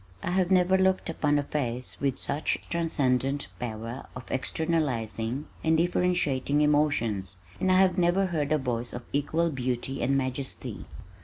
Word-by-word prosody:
I 170 - -1
have 185 -1 +2
never 185 0 +4
looked 190 -2 +2
upon 150 -2 +1
a 145 - +1
face 125 -4 -3
with 135 -2 +1
such 150 - 0
transcendent 140 -5 +1
power 115 +1 -5
of 130 -2 -8
externalizing 130 - -1 0.2
and 160 0 +3
differentiating 165 -5 +1
emotions, 120 -11 +1 0.2
and 185 - +2
I 185 - +5
have 185 -1 +3
never 180 +3 +3
heard 155 -5 -1
a 155 - +4
voice 120 -3 -2
of 120 - -5
equal 160 +4 +1
beauty 130 0 -2
and 135 +1 +2
majesty. 130 - -4
145 Hz, 150 wpm, -28 LUFS, 125-170 Hz, 0.2 s, I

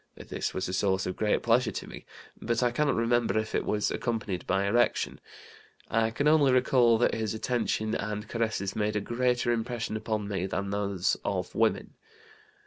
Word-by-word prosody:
This - - -4
was 95 - -3
a 90 - -4
source 95 0 +1
of 90 - -3
great 105 -1 0
pleasure 120 0 +3
to - - -5
me, - - -11 0.3
but 115 +2 0
I 120 - +2
cannot 140 +2 +1
remember 115 -2 +1
if 110 0 -2
it - - +1
was 105 -1 0
accompanied 110 -6 -3
by 95 +1 +1
erection. 120 +4 +1 0.7
I 115 0 +2
can 145 +6 -1
only 150 -3 +5
recall 125 -2 +4
that 120 - +2
his 110 -1 -2
attention 110 -2 -1
and 105 0 -3
caresses 110 -4 -2
made 105 0 0
a - - +2
greater 120 +2 0
impression 115 -1 -2
upon 110 -1 -2
me 95 -2 -2
than 100 +1 -3
those 100 -2 0
of - - -2
women. - - 0
110 Hz, 180 wpm, -28 LUFS, 100-120 Hz, 0.7 s, only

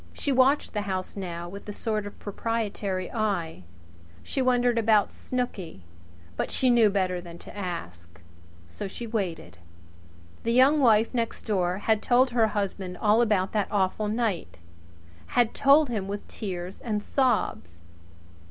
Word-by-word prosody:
She 285 - -2
watched 265 +2 +3
the 210 - -1
house 185 -1 -3
now 175 -3 -5
with 200 +3 -9
a - - -2
sort 215 -1 -2
of 205 - -10
proprietary 205 -3 -3
eye. 195 - -2 0.6
She 270 - -2
wondered 245 -2 +3
about 215 -2 +3
Snooky; 195 - -4 0.5
but - - -2
she 255 -1 +2
knew 230 -3 +5
better 185 -3 0
than 170 -1 -10
to - - -12
ask. 85 - -6 0.5
So 85 - -7
she 235 +5 -7
waited. 180 - -4 0.8
The 230 - 0
Young 265 +5 +5
Wife 225 -3 +4
next 230 -2 -2
door 185 -4 0
had 215 +1 +1
told 255 +1 +3
her 230 -2 +3
husband 195 -3 -3
all 215 +4 +3
about 205 -5 +1
that 210 -2 0
awful 205 +1 0
night 205 - -2 0.8
had 240 -2 +4
told 280 +1 +5
him 210 -5 -2
with 205 +1 -5
tears 185 -3 -6
and 210 -3 -2
sobs. 215 - 0
210 Hz, 150 wpm, -27 LUFS, 185-235 Hz, 0.8 s, knew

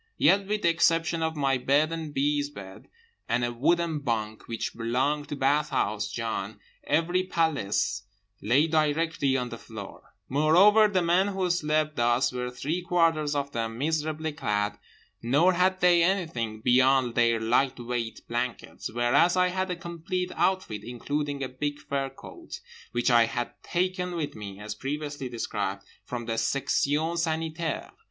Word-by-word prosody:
Yet 195 0 +4
with 210 +1 -1
the 170 - +5
exception 165 0 +2
of 160 0 -1
my 135 -3 +1
bed 145 +5 +2
and 160 -2 -4
B.'s 145 +1 0
bed 95 -9 -11 0.4
and 120 +1 +1
a 120 - -3
wooden 165 +5 +1
bunk 110 -5 -3
which 115 -1 -3
belonged 130 +6 -1
to 145 - -3
Bathhouse 135 -7 0
John, 110 -2 -4 0.3
every 165 +5 +1
paillasse 140 - 0 0.4
lay 125 +8 +3
directly 155 -3 +1
on 125 -1 -2
the 115 - -8
floor; 105 -4 -11
moreover 180 +10 +5
the 190 -4 +1
men 175 +3 +3
who 190 -2 -1
slept 155 -2 0
thus 120 +2 +2
were 125 0 -3
three 145 +8 -3
quarters 165 -4 +1
of 140 0 -2
them 115 -1 -3
miserably 155 +2 -1
clad, 105 -8 -1 0.4
nor 145 +10 +3
had 185 +1 +2
they 175 -1 +5
anything 160 - -1
beyond 130 0 +4
their 115 -1 +3
light 125 +4 +1
weight 120 -2 -4
blankets—whereas 120 - 0
I 180 0 +4
had 185 +1 -2
a 180 - -1
complete 170 +2 -4
outfit 185 - 0
including 140 +4 -3
a - - -1
big 145 +3 -3
fur 140 -2 -3
coat, - - -10 0.3
which 120 +1 +1
I 120 -1 +6
had 120 +1 -3
taken 180 0 -1
with 155 -4 -3
me 100 -2 -8
(as 105 +1 -5
previously 145 -1 -4
described) 105 -4 -3 0.2
from 120 -1 -5
the 115 0 -1
Section 145 +6 0
Sanitaire. 160 -1 -2
145 Hz, 150 wpm, -27 LUFS, 120-165 Hz, 0.4 s, I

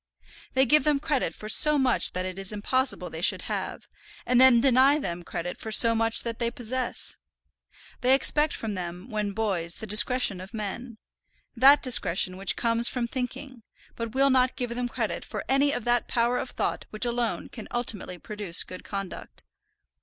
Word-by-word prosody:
They 265 +1 +4
give 300 +5 +3
them 300 -2 +1
credit 295 -2 -1
for 215 - -9
so 300 +7 +5
much 260 -3 +2
that 185 0 -2
it 185 +1 -5
is 195 +1 -3
impossible 255 +6 -1
they - - -7
should - - +2
have, - - -5 0.4
and 250 0 +3
then 260 -2 +7
deny 265 +3 +4
them 175 - -5
credit 175 0 -6
for 220 - -7
so 230 +2 +6
much 225 0 +2
that 230 -1 -5
they 235 -1 0
possess! 245 +1 -2 0.8
They 255 +2 +4
expect 300 +2 0
from 220 -2 -5
them 180 +3 -7
when 210 -2 -3
boys 190 -6 -2
the - - -7
discretion 215 -2 +4
of 195 +5 -10
men, 220 +3 -6 0.6
that 275 +4 +6
discretion 185 -7 +2
which 195 0 0
comes 235 0 +1
from 245 -2 -2
thinking; 255 +1 -6 0.3
but 230 +1 -6
will 275 +1 +3
not 255 -1 +2
give 245 -2 -4
them 245 +1 -3
credit - - -3
for - - -6
any 275 +2 +2
of 245 - -4
that 240 0 0
power 240 +1 0
of - - -5
thought - - -4
which 215 +3 -2
alone 240 -1 -2
can 225 - -10
ultimately 220 -6 -4
produce 205 -2 -3
good 185 - -11
conduct. 195 -2 -7
235 Hz, 185 wpm, -26 LUFS, 210-255 Hz, 0.8 s, then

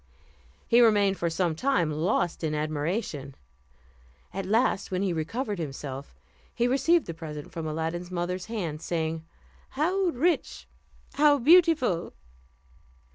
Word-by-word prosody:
He 235 +1 +5
remained 205 -4 +4
for 170 - 0
some 170 0 0
time 170 - +1
lost 170 +2 0
in 155 -1 0
admiration. 150 - -3 1.0
At 195 -1 -4
last, 220 -1 +1
when 185 +1 -1
he 195 - +1
had 175 - -1
recovered 205 - -3
himself, 135 - -6 0.4
he 240 - +2
received 290 +7 +3
the 165 - -5
present 155 -2 -8
from 165 -1 -5
Aladdin's 165 +3 -3
mother's 180 +1 -3
hand; 175 -9 -4
saying, 160 -2 -2 0.5
"How 360 +8 +1
rich, 335 +1 0 0.5
how 290 0 +5
beautiful!" 295 - +4
180 Hz, 130 wpm, -27 LUFS, 160-245 Hz, 1.0 s, He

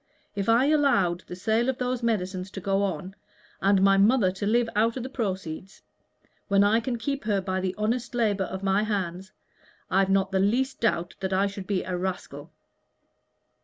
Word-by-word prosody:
If 200 0 -2
I 235 +4 +5
allowed 270 - +2
the 180 - -7
sale 220 +6 +1
of 260 - -1
those 250 -1 -2
medicines 190 -5 -2
to - - -5
go 195 +1 0
on, 190 -1 -3 0.5
and 195 0 +3
my 195 0 +5
mother 205 -1 +4
to 190 +2 -4
live 235 +2 +2
out 225 +3 +2
of 250 - -4
the 260 - -5
proceeds 190 -7 -5 0.6
when 200 0 +4
I 210 +3 +4
can 240 +1 -3
keep 275 +2 -3
her 205 -2 +1
by 185 0 -2
the 185 0 -2
honest 230 +4 -2
labor 210 -5 +1
of 190 +1 -6
my 195 +1 +2
hands, 190 -3 -3 0.6
I've 195 +1 +3
not 195 0 +2
the 190 - +1
least 250 +8 +1
doubt 175 -7 0
that 190 0 -2
I 190 +1 +3
should 200 -1 -6
be 195 -3 0
a 185 - -3
rascal." 175 -5 -5
200 Hz, 190 wpm, -26 LUFS, 190-230 Hz, 0.6 s, I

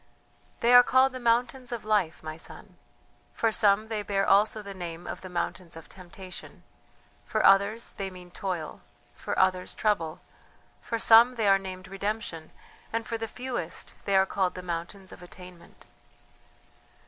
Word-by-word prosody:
"They 240 +1 +4
are 245 - +11
called 260 +2 +3
the 255 - -7
mountains 245 +2 0
of 235 -3 -5
Life, 205 -7 0
my 155 0 -6
son. 165 - -8 0.6
For 225 - +1
some 215 0 +3
they 220 -2 -2
bear 195 -1 0
also 210 +2 +3
the 200 -1 -8
name 175 -2 -7
of - - -6
the 185 - -9
mountains 175 -1 -4
of 165 - -11
Temptation; 185 0 -11 0.6
for - - 0
others 200 +4 +4
they 195 -1 -3
mean 180 -1 -13
Toil; 175 -5 -5 0.3
for - - -5
others 185 -1 +1
Trouble; 175 -6 -1 0.6
for 230 - -3
some 230 +2 +7
they 220 -3 0
are 195 0 +5
named 185 -1 -8
Redemption, 195 -4 -4 0.4
and 230 0 -2
for 230 0 -4
the 225 - -3
fewest 245 -8 -5
they 200 - +1
are 190 0 +5
called 190 -1 -1
the 180 - -7
mountains 180 +3 -6
of - - -12
Attainment." 180 -1 -14
195 Hz, 160 wpm, -27 LUFS, 180-225 Hz, 0.6 s, are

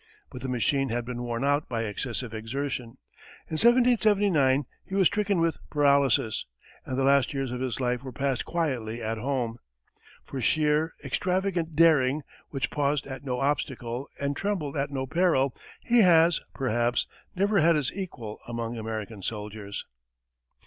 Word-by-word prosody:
But 125 - -8
the 130 - -4
machine 135 +2 +1
had 120 +1 -2
been 120 0 -5
worn 120 0 -3
out 145 +1 +1
by 115 -2 -1
excessive 115 +2 -4
exertion; 120 +2 -4 0.5
in - - -9
1779 205 - +4 0.2
he 190 - -6
was 195 -1 +4
stricken 205 -1 +2
with 165 -1 +1
paralysis, 140 -6 +2 0.4
and 130 - -2
the 135 - +1
last 140 +1 +3
years 135 -2 -2
of 125 0 -4
his 130 -1 -2
life 125 -1 0
were 135 -1 -7
passed 135 0 -1
quietly 130 -10 -2
at 110 0 -2
home. 120 -2 -2 0.6
For 135 - -6
sheer, 155 +5 +2
extravagant 180 -3 -1
daring, 150 -3 +4 0.3
which 140 0 -2
paused 145 -1 0
at 135 0 -7
no 125 -2 -2
obstacle 130 -3 -2
and 140 0 -1
trembled 175 -6 -2
at 140 0 -1
no 135 -2 -3
peril, 140 -4 +2 0.3
he 240 -1 +4
has, 170 -4 +5
perhaps, 120 -2 +1 0.3
never 200 +2 +2
had 165 +1 +5
his 145 -4 -1
equal 130 - -6
among 115 0 -4
American 110 -2 -5
soldiers. 105 0 -5
135 Hz, 155 wpm, -27 LUFS, 120-160 Hz, 0.6 s, has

